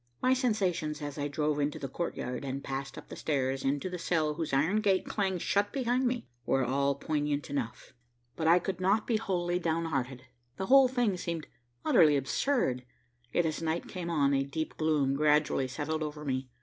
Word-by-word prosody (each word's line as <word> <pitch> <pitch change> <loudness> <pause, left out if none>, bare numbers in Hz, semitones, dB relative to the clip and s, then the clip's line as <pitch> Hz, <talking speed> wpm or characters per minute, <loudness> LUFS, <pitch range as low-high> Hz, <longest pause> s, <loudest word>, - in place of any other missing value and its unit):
My 255 - +3
sensations 190 - 0
as 145 -1 -5
I 145 - 0
drove 150 0 0
into 145 0 0
the 135 - -4
courtyard 130 -4 -4
and 135 0 -4
passed 135 0 -5
up - - -10
the - - -7
stairs, 135 -3 -1
into 140 +5 0
the 180 -1 -5
cell 160 -3 +1
whose 160 0 -3
iron 160 +11 +2
gate 195 -3 +2
clanged 190 -4 -1
shut 205 0 +1
behind 255 -1 +1
me, 245 0 -2 0.2
were 135 +2 +1
all 140 +2 +1
poignant 145 -1 -2
enough, 125 -5 -4 0.4
but 160 - -1
I 170 +2 +7
could 185 +1 -3
not 200 +4 +2
be 230 - +1
wholly 180 -4 -1
downhearted. 155 -7 -1 0.3
The 190 - -2
whole 270 +3 +7
thing 245 -7 +1
seemed 170 -3 -4 0.4
utterly 150 -3 +6
absurd, 135 - 0 0.5
yet 175 - +2
as 160 0 -2
night 165 +1 -1
came 175 -2 -5
on, 140 -4 +2
a 135 - +3
deep 155 +3 -4
gloom 150 -4 +1
gradually 150 -2 +2
settled 150 +4 -3
over 150 0 -4
me. 130 -1 -2
155 Hz, 190 wpm, -30 LUFS, 140-185 Hz, 0.5 s, I